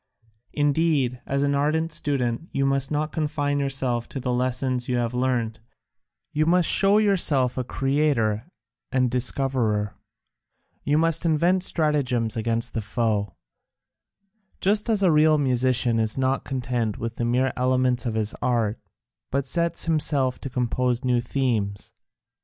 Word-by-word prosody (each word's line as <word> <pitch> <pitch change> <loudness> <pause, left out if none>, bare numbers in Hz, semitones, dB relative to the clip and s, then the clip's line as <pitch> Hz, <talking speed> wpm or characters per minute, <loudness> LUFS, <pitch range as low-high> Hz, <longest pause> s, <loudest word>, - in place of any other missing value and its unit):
Indeed, 145 -4 +1
as 140 +1 0
an 140 0 +1
ardent 155 +3 0
student, 140 -1 -1
you 135 - 0
must 135 0 +1
not 150 +1 -2
confine 145 -2 -1
yourself 130 -4 -1
to 135 - -5
the 125 -1 -2
lessons 125 0 -1
you 125 - +1
have 120 0 -1
learnt; 125 -3 -1 0.7
you 155 +1 +1
must 175 0 +3
show 200 +1 +5
yourself 160 - +2
a 130 - -2
creator 135 -4 0 0.4
and 130 -2 +1
discoverer, 125 -5 0 0.9
you 145 +1 +1
must 165 0 +2
invent 170 +3 +2
stratagems 140 - 0
against 115 0 0
the 115 - -2
foe; 105 -1 -1 1.2
just 210 +3 +2
as 210 -3 +2
a 180 - +5
real 155 0 +4
musician 125 -3 +2
is 110 +1 0
not 130 0 0
content 120 -5 -2
with 115 0 -5
the 120 - -1
mere 125 +2 +1
elements 125 -1 +1
of 110 - -2
his 110 -1 0
art, 115 -3 0 0.5
but 140 0 -1
sets 170 +4 -2
himself 145 -5 +1
to 135 - -6
compose 125 0 -1
new 125 -1 +2
themes. 115 -6 -2
130 Hz, 140 wpm, -24 LUFS, 120-150 Hz, 1.2 s, show